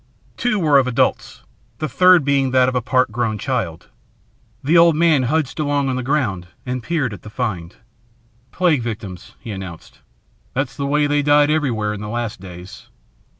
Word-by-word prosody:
Two 230 -3 0
were 150 -6 +4
of 130 - 0
adults, 125 - -1 0.3
the 155 - -2
third 180 -2 +5
being 140 -2 +2
that 130 0 +3
of 130 - 0
a 125 - 0
part 130 -1 +1
grown 110 -1 -1
child. 90 - -3 0.7
The 150 +6 +2
old 170 -1 +6
man 155 -6 +3
trudged 155 0 -1
along 145 -2 0
on 130 - -1
the 130 - -2
ground 120 -10 -1 0.2
and 125 0 -3
peered 145 -6 -1
at 100 - -10
the 105 - -10
find. 100 -8 -4 0.8
"Plague 165 -7 +2
victims," 105 -6 -7
he 115 - -8
announced. 95 -4 -9 0.6
"That's 130 -1 -2
the 140 +2 -3
way 150 +1 +2
they 145 0 +1
died 145 +1 +4
everywhere 120 -9 0
in 105 - -7
the 105 - -6
last 115 -2 -4
days. 90 0 -11
130 Hz, 180 wpm, -20 LUFS, 110-145 Hz, 0.8 s, old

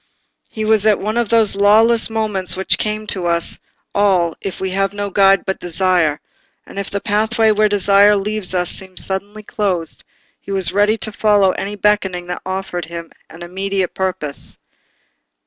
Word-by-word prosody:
He 220 -1 -4
was 220 -1 +3
at 210 - +3
one 215 +2 -3
of 235 -3 0
those 225 -3 +3
lawless 220 +4 +4
moments 210 -5 -2
which 190 - +1
come 215 0 -2
to 185 -4 0
us 170 0 0 0.3
all 185 -5 +2
if 195 - -5
we 190 0 -3
have 195 +1 0
no 205 -1 -4
guide 195 0 +4
but 190 - -3
desire, 175 -4 +1 0.5
and 195 - -8
if 200 - -4
the 200 - -3
pathway 220 +2 +1
where 215 0 +2
desire 205 0 +4
leads 205 -1 -2
us 180 -1 0
seems 190 -1 -2
suddenly 200 +2 -4
closed; 190 -6 -3 0.4
he - - -15
was 190 -2 0
ready 205 +2 +2
to 215 - -2
follow 205 -2 +3
any 200 +2 -5
beckoning 195 -3 0
that 180 0 -5
offered 185 -2 -4
him 170 0 -8 0.2
an 165 +2 -11
immediate 190 +1 -2
purpose. 180 -7 -3
195 Hz, 170 wpm, -18 LUFS, 185-210 Hz, 0.5 s, lawless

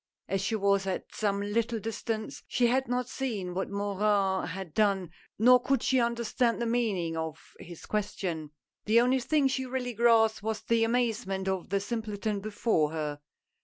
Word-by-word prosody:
As 195 0 -1
she 210 +3 0
was 200 -1 +2
at 190 - -4
some 200 -2 0
little 230 +3 0
distance 220 0 -4
she 245 - +2
had 260 +3 +2
not 245 0 -1
seen 215 -10 -3
what 190 +2 -2
Morin 200 -1 +1
had 185 -3 -6
done, 195 -4 +1 0.3
nor 250 +3 +6
could 270 -1 +1
she 260 - +3
understand 235 0 +1
the 235 - -1
meaning 210 -9 0
of 160 -1 -3 0.2
his 170 -1 -10
question. 185 -7 -3 0.4
The 220 +3 +5
only 250 +2 +3
thing 285 +2 +2
she 260 -1 -2
really 250 -1 -3
grasped 225 -1 +4
was 220 0 -2
the 230 -1 +2
amazement 225 -5 0
of 190 -2 -2
the 200 +1 +1
simpleton 210 -1 -3
before 205 -6 +1
her. 150 -2 -3
215 Hz, 165 wpm, -29 LUFS, 195-235 Hz, 0.4 s, nor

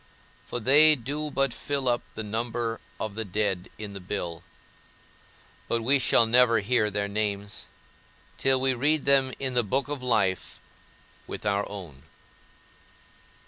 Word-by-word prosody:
For 120 - -4
they 150 +6 +6
do 145 +4 -4
but 135 -3 0
fill 140 +2 -3
up 120 -1 +2
the 110 - -4
number 115 +1 -3 0.2
of 110 -2 -3
the 110 +2 -3
dead 100 -2 -2
in 105 -2 -7
the 100 - -6
bill, 90 -3 -4 1.3
but 115 -1 -1
we 135 +4 +4
shall 120 - +4
never 115 0 +5
hear 110 0 +1
their 100 0 -2
names, 100 -1 -3 0.7
till 135 -1 +3
we 130 0 +2
read 145 +4 +1
them 135 -1 +4
in 130 -2 -2
the 125 - +4
book 130 +6 -1
of 145 -2 -4
life 105 -7 0 0.7
with - - -7
our 100 0 0
own. 90 -10 -9
115 Hz, 145 wpm, -27 LUFS, 100-130 Hz, 1.3 s, they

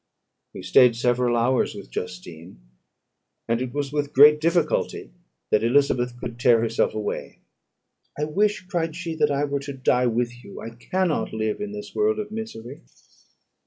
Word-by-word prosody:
We - - -8
stayed 125 -2 +5
several 120 0 +1
hours 125 +2 +1
with - - -10
Justine; 90 -2 -8 0.9
and 115 +1 0
it 130 -1 -3
was 145 +1 -3
with 145 -1 -2
great 150 +2 +7
difficulty 165 - 0 0.4
that 105 - +3
Elizabeth 125 -1 +1
could 120 0 -7
tear 120 -2 +5
herself 115 -1 0
away. 105 -1 -4 0.8
"I 150 - -2
wish," 200 +6 0
cried 165 -3 -2
she, 170 -1 -4
"that 150 -1 +3
I 140 0 0
were 140 -1 -1
to 140 0 -7
die 125 -1 +1
with 120 +1 -2
you; - - -10
I 115 - -7
cannot 180 +8 -2
live 110 - -2
in 210 0 -4
this 210 -1 -8
world 215 0 +1
of 210 -1 -5
misery." 220 - -7
130 Hz, 160 wpm, -24 LUFS, 115-165 Hz, 0.9 s, great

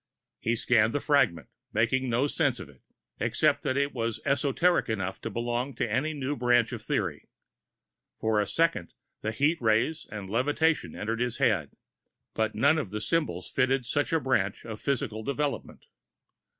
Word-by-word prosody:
He 115 +1 0
scanned 115 -2 +3
the 145 - +1
fragment, 140 - +2 0.3
making 125 +4 +1
no 120 +4 +2
sense 145 -4 0
of 95 - -8
it, 70 - -19 0.4
except - - +2
that 130 - -1
it 140 0 +1
was 115 -3 -2
esoteric 140 +4 +2
enough 95 -4 -3
to - - -4
belong 120 +3 -2
to - - -1
any 130 +8 -1
new 140 0 -2
branch 120 -2 +3
of - - -5
theory. - - -2 0.9
For 110 -1 +1
a 105 - +1
second, 160 - 0 0.3
the 110 - -1
heat 150 +8 +1
rays 115 +8 +1
and 100 -3 -6
levitations 145 +9 +1
entered 115 +2 -3
his 120 -1 -1
head 95 -11 +1 0.6
but 110 -1 -1
none 140 +8 +4
of 120 - -4
the 105 +2 -4
symbols 155 +9 -1
fitted 130 0 +1
such 145 +4 0
a 165 - +3
branch 110 -8 0
of 110 -2 -7
physical 115 -5 -1
development. 140 +4 -3
120 Hz, 165 wpm, -28 LUFS, 110-140 Hz, 0.9 s, none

